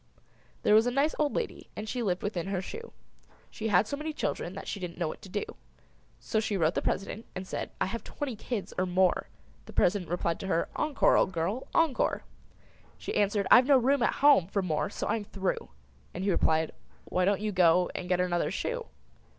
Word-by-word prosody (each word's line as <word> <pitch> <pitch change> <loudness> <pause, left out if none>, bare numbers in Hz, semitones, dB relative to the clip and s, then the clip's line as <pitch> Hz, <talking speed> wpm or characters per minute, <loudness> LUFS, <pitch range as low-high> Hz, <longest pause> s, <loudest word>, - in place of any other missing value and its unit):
There - - +4
was 220 +3 +6
a - - +4
nice 280 +5 +1
old 295 -2 +1
lady 475 - -4
and 215 - -5
She 245 +2 -2
lived 185 -5 -1
within 190 -4 -2
her 195 -1 -1
shoe; 455 - -7 0.6
She 220 - -4
had 200 -1 +4
so 285 - -3
many 305 +2 -4
children 180 - -3
that 195 - -7
She 200 - -4
didn't 180 -2 -6
know 170 -2 -1
what - - -6
to 195 - -11
do. 205 +2 -2 0.8
She 215 -2 -1
wrote 165 -1 +2
the - - -1
President 200 +3 -3
and 185 - -4
said - - -4
"I - - +2
have 230 +3 -4
twenty 280 -5 -5
kids 215 -1 -4
or 185 - +1
more!" 185 0 +2 0.4
The - - -10
President 180 -2 +2
replied 170 -1 -1
to 190 - -5
her 170 -3 0
"Encore, 300 -2 +3
old - - +3
girl, 190 +8 -2
encore!" 320 -6 +2 0.7
She - - -5
answered, 205 0 +1
"I've 250 +1 +8
no 280 -2 +7
room 265 +2 +2
at - - +3
home 275 - +7
For 200 0 -1
more, 155 -4 -1
so - - -4
I - - +1
am 215 - -5
through!" 195 - -3 0.5
And 180 - -3
he 200 - +2
replied, 160 -2 +2 0.3
"Why 185 - 0
don't 195 +1 +2
you 210 0 -2
go 180 -1 +4
And 180 - -5
get 180 -1 +2
another 175 -1 +1
shoe?" - - -3
200 Hz, 215 wpm, -29 LUFS, 180-235 Hz, 0.8 s, I've